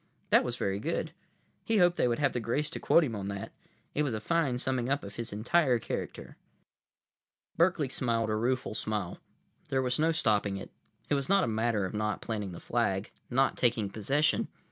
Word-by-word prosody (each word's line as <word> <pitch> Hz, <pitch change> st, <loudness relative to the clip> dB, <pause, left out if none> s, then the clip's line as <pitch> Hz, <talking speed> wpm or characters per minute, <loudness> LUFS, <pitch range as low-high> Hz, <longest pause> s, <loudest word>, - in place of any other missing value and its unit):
That -, -, +6 dB
was -, -, -3 dB
very 100 Hz, 0 st, -1 dB
good. -, -, -2 dB, 0.5 s
He 225 Hz, -, +1 dB
hoped 175 Hz, -2 st, +5 dB
they -, -, +2 dB
would 120 Hz, -, +1 dB
have 145 Hz, -2 st, +1 dB
the 120 Hz, -, -1 dB
grace 120 Hz, +6 st, -1 dB
to -, -, -5 dB
quote 170 Hz, -, +5 dB
him 120 Hz, -7 st, -2 dB
on 100 Hz, -1 st, -4 dB
that. 100 Hz, -1 st, -5 dB, 0.4 s
It 150 Hz, -, +1 dB
was 135 Hz, -6 st, 0 dB
a -, -, -2 dB
fine 145 Hz, 0 st, +1 dB
summing 125 Hz, -1 st, -1 dB
up 140 Hz, +1 st, 0 dB
of 100 Hz, 0 st, -8 dB
his 115 Hz, +2 st, -5 dB
entire 125 Hz, +5 st, +2 dB
character. 115 Hz, -, -5 dB, 1.2 s
Berkeley 170 Hz, -4 st, +3 dB
smiled 115 Hz, -4 st, 0 dB
a -, -, +1 dB
rueful 125 Hz, +2 st, 0 dB
smile. 105 Hz, -4 st, -3 dB, 0.5 s
There 130 Hz, -1 st, +1 dB
was 125 Hz, +1 st, 0 dB
no 160 Hz, +2 st, +3 dB
stopping 105 Hz, -10 st, +1 dB
it. 95 Hz, -, -8 dB, 0.4 s
It -, -, +2 dB
was 140 Hz, +1 st, 0 dB
not 195 Hz, -1 st, +5 dB
a -, -, +1 dB
matter 110 Hz, -2 st, +1 dB
of 95 Hz, -, -5 dB
not 105 Hz, 0 st, -1 dB
planting 105 Hz, -4 st, -4 dB
the 85 Hz, -, -8 dB
flag, 105 Hz, -4 st, -1 dB, 0.2 s
not 135 Hz, +2 st, +2 dB
taking 115 Hz, -5 st, +1 dB
possession. 135 Hz, +9 st, +1 dB
120 Hz, 200 wpm, -30 LUFS, 105-140 Hz, 1.2 s, That